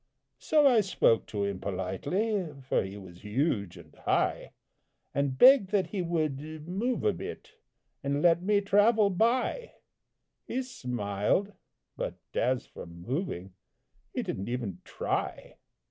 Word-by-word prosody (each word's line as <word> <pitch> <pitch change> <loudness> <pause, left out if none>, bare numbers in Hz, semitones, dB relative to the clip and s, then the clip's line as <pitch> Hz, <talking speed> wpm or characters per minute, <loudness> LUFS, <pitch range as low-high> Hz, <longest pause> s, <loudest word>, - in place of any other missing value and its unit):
So 300 -2 +3
I 245 -5 +6
spoke 185 - +2
to 105 -2 -2
him 100 -2 -2
politely, 170 - -1 0.2
For - - +2
he 95 +1 -6
was 90 -3 -12
huge 105 - -1
and 80 -3 -14
high, - - 0 0.6
And 140 -2 0
begged 255 - +8
that 200 -2 +1
he 200 - -1
would 160 -5 -1 0.3
move 225 +8 -1
a 430 - +3
bit, 450 - -8 0.5
And 140 +1 0
let 170 -1 +5
me 200 +2 +2
travel 205 +1 +4
by 245 - +1 0.7
He 260 +2 -1
smiled, 125 - -1 0.4
but - - -3 0.2
as 125 +1 +1
for - - -10
moving 95 - -4 0.6
He - - -2
didn't 95 +4 -4
even 115 -8 -4
try. - - -3
155 Hz, 130 wpm, -29 LUFS, -, 0.7 s, begged